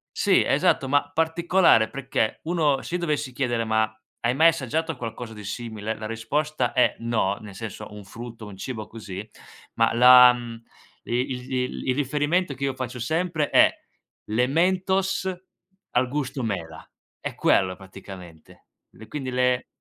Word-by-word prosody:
Sì, - - +3
esatto, 135 - +2
ma, 145 +1 +2
particolare 165 -6 +3
perché, 130 -5 -2
uno 155 -5 +1
se 175 - -5
io - - -1
dovessi 150 -5 -1
chiedere: 120 -3 -1
"Ma 110 0 +1 0.3
hai 120 +1 +1
mai 160 +4 +6
assaggiato 160 +1 -2
qualcosa 115 -1 -6
di 105 -1 -10
simile?", 110 0 -5
la 110 0 -6
risposta 145 +8 -1
è: 125 - +3
"No". 115 -4 0
Nel 105 -3 -11
senso 110 -1 -7
un 105 -1 -9
frutto, 115 +2 -9
un 100 -2 -10
cibo 110 +1 -6
così, 105 -2 -8 0.5
ma 115 0 +2
la, 125 +1 +9
mhmm, 120 -1 -8 0.4
il 125 +1 -3
il 125 +1 -2
il 130 - +2
riferimento 145 +4 0
che 135 - -7
io 135 - -1
faccio 130 -1 -5
sempre, 160 +4 -1
è - - +6 0.5
le 120 +4 +1
mentos 190 +4 +1 0.6
al 125 +1 +2
gusto 135 -1 -3
mela, 85 -7 -5 0.3
è - - -5
quello 95 -1 +2
praticamente. 95 -4 -13 0.3
E 110 - -11
quindi 135 +1 -5
le 125 0 +1
125 Hz, 155 wpm, -25 LUFS, 110-145 Hz, 0.6 s, la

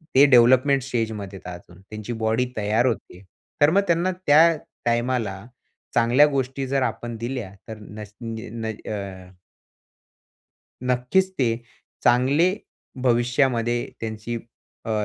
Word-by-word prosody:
ते 135 +2 +8
डेव्हलपमेंट 130 +2 +5
स्टेजमध्ये 110 -6 -3
आहेत 90 -1 -7
अजून. 90 +1 -19
त्यांची 110 +3 -7
बॉडी 110 +3 +2
तयार 110 +3 +1
होत 115 - +1
आहे. 90 - -14 0.4
तर 145 - +7
मग 200 - +4
त्यांना 170 +2 +2 0.2
त्या 160 +3 +6 0.3
टाईमाला 120 -5 -1 0.5
चांगल्या 120 +5 +5
गोष्टी 135 -1 -2
जर 135 +1 0
आपण 120 -2 -3
दिल्या 115 -4 -5
तर 110 -1 -7
नस 105 0 -10
न 115 0 -6
अ 100 -4 -6 1.6
नक्कीच, 125 +10 +2
ते 115 -4 +2 0.5
चांगले 135 +9 +4 0.5
भविष्यामध्ये 120 -1 +1
त्यांची 110 +1 -4 0.5
अ, 115 - -4
120 Hz, 120 wpm, -23 LUFS, 110-130 Hz, 1.6 s, ते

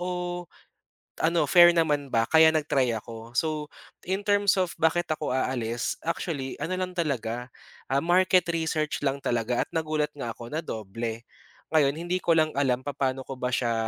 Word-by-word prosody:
o 180 0 -3 0.8
ano, 165 0 +3
fair 175 +3 +7
naman 150 -4 +1
ba 115 -1 +2
kaya 160 0 +7
nag-try 135 -5 +1
ako. 115 +1 -10
So, 155 -2 0 0.4
in 195 +2 -1
terms 205 -1 +3
of 185 -3 +1
bakit 175 +2 +2
ako 155 -1 -4
aalis, 120 -3 -1
actually 150 -5 -3
ano 185 - -3
lang 185 0 -3
talaga, 125 -6 -2 0.4
ah, 135 - +3
market 180 +1 +3
research 160 -2 -1
lang 135 +1 0
talaga 120 0 0
at - - -4
nagulat 155 -2 0
nga 120 -4 -4
ako 115 - -9
na 155 - -1
doble. 115 +2 -5 0.5
Ngayon, 145 -2 +3
hindi 175 +2 -1
ko 170 - +2
lang 155 -1 +3
alam 130 -3 +2
papaano 135 -2 -2
ko 135 - -5
ba 125 0 -2
siya, 120 -1 +1
150 Hz, 170 wpm, -26 LUFS, 125-170 Hz, 0.8 s, fair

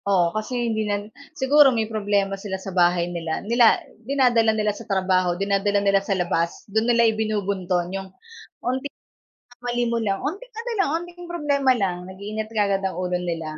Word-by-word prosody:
Oo, 175 -4 +3
kasi 240 +3 -2
hindi 220 - -1
niyan 205 +1 -3 0.2
siguro 285 +1 +6
may 230 -4 0
problema 205 -2 0
sila 195 -1 -4
sa 190 0 -8
bahay 175 -1 +3
nila 165 -2 -3
nila 235 +1 +5 0.2
dinadala 240 -3 +3
nila 210 -1 +1
sa 220 +2 -11
trabaho, 185 -2 +1
dinadala 200 +1 +1
nila 200 -1 +3
sa 195 -1 -1
labas, 170 -1 -1
'don 220 +3 0
nila 235 -1 +4
ibinubunton 200 -5 0
yung 195 0 -5 0.6
unti 260 +3 -1 0.5
na 245 - -24
mali 240 0 0
mo 235 - 0
lang, 200 -4 -1
unting 410 +12 -5
ano 465 +2 -5
lang, 390 - +2
unting 350 0 -10
problema 290 -6 +1
lang, 195 -7 -1
nag-iinit 200 +4 -5
kaagad 200 -2 +1
ang 190 - -1
ulo 180 -1 -1
nila. 165 -3 -4
205 Hz, 175 wpm, -23 LUFS, 190-240 Hz, 0.6 s, siguro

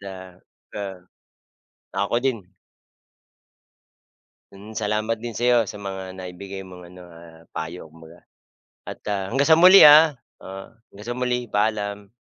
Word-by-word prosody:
ah 95 -1 -10 0.4
pa 95 -3 -7 1.0
ako 120 - -1
din. 110 -8 -3 2.0
Hmm, 105 +3 -13
salamat 110 +1 -1
din 115 +1 -7
sa 120 +2 -2
'yo 120 -1 +4
sa 105 0 -9
mga 95 -1 -7
naibigay 95 +2 -8
mong 90 -1 -13
ano, 90 -1 -14
ah, 85 -1 -16
payo 80 +1 -6
kumbaga. 80 +2 -16 0.7
At, - - -8
ah, 100 -1 -3
hanggang 140 +3 +1
sa 160 - +7
muli, 185 +2 +9
ah. 150 0 +7 0.3
Oo, 95 +4 -10 0.2
hanggang 105 +3 -13
sa 120 - -3
muli 125 -1 -2
,paalam. 105 -1 -2
100 Hz, 135 wpm, -22 LUFS, 90-115 Hz, 2.0 s, muli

